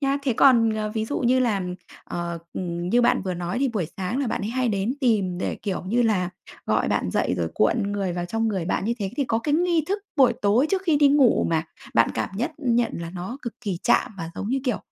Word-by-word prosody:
Nhá, 275 0 +1
thế 265 -4 +1
còn, 230 -2 +5
ờ, 215 -1 -2
ví 220 0 0
dụ 285 - -2
như 255 +1 +3
là, 210 -6 +1 0.4
ờ, 170 -1 -4
ừm, 175 -1 -3
như 240 +5 +4
bạn 240 - +3
vừa 185 -1 -2
nói 175 +5 -3
thì 275 -1 +2
buổi 205 -9 -2
sáng 195 +7 -2
là 275 - 0
bạn - - -2
ấy 210 - -2
hay 255 0 0
đến 205 +5 0
tìm 200 -8 +1
để, - - -2
kiểu 195 -3 -2
như 240 +3 +2
là, 185 -5 +1 0.4
gọi - - +1
bạn - - 0
dậy - - 0
rồi - - 0
cuộn 205 -3 +1
người 195 -3 -1
vào 175 0 -3
trong 225 +3 0
người 190 -5 -2
bạn 190 - -1
như 235 +2 0
thế, 195 -2 -2
thì 280 - +1
có 225 -2 0
cái 290 +5 0
nghi 340 -2 +2
thức 405 +2 0 0.2
buổi 265 -3 +5
tối 220 +8 +4
trước 385 -1 +1
khi 325 -6 +2
đi 285 -1 +5
ngủ 275 -4 +4
mà 160 -1 +1 0.3
bạn 115 - +4
cảm - - -1
nhất 235 - -1
nhận 240 -2 +1
là 170 0 -5
nó 190 +9 -6
cực 235 - -5
kỳ 195 -7 -3
chạm - - +3
và, 165 0 -5
giống 200 - -4
như 265 +2 0
kiểu, 250 -4 0
225 Hz, 255 wpm, -24 LUFS, 185-255 Hz, 0.4 s, còn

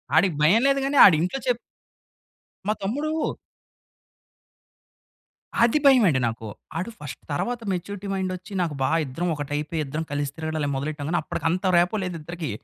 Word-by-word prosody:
ఆడికి 170 0 +4
భయం 195 +10 +5
లేదు 275 0 +3
గాని, 280 +1 0
ఆడు 185 - +8
ఇంట్లో 180 +11 -1
చెప్ప 245 -2 +2 1.1
మా 210 - +3
తమ్ముడు 285 +10 -1 2.5
అది 235 +5 +4
భయమండి 225 - +6
నాకు. 115 0 -5 0.3
ఆడు 185 +7 -3
ఫస్ట్ 145 -3 -8
తరువాత, 240 +11 -2
మెచ్యూరిటీ 190 +2 -4
మైండ్ 190 -1 -1
వచ్చి 180 +2 -12
నాకు 165 -4 -1
బా 130 - +2 0.2
ఇద్దరం 165 +7 -3
ఒకటి 145 -1 -6
అయిపోయి, 150 +2 -2
ఇద్దరం 150 +4 -3
కలిసి 145 -1 -2
తిరగడాలు 160 -2 -3
అయి 140 - -1
మొదలెట్టాం 145 +2 -3
గాని. 175 - +1
అప్పటికి - - -5
అంత 180 +3 -1
రాపో 180 +5 +2
లేదు 180 -2 -4
ఇద్దరికి. 165 -1 -5
175 Hz, 160 wpm, -24 LUFS, 150-205 Hz, 2.5 s, ఆడు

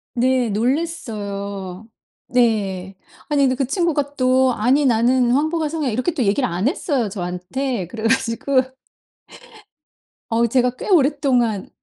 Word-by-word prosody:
네 250 0 +2
놀랬어요. 205 - -3 0.4
네. 200 -6 0 0.3
아니 285 -1 +2
근데 260 -1 +2
그 270 0 0
친구가 290 -2 -1
또 255 0 +3
"아니. 260 +7 +2
나는 245 +1 +3
황보가 310 +3 +1
성이야." 305 -4 -2
이렇게 255 +9 -1
또 260 - -1
얘기를 220 +6 +1
안 180 +8 -1
했어요 275 - -1
저한테. 185 +4 -3
그래 220 +3 -8
가지고 230 +4 +1 1.7
어 230 +1 +2
제가 250 +1 +2
꽤 - - -7
오랫동안 270 - +2
245 Hz, 265 characters per minute, -20 LUFS, 215-275 Hz, 1.7 s, 또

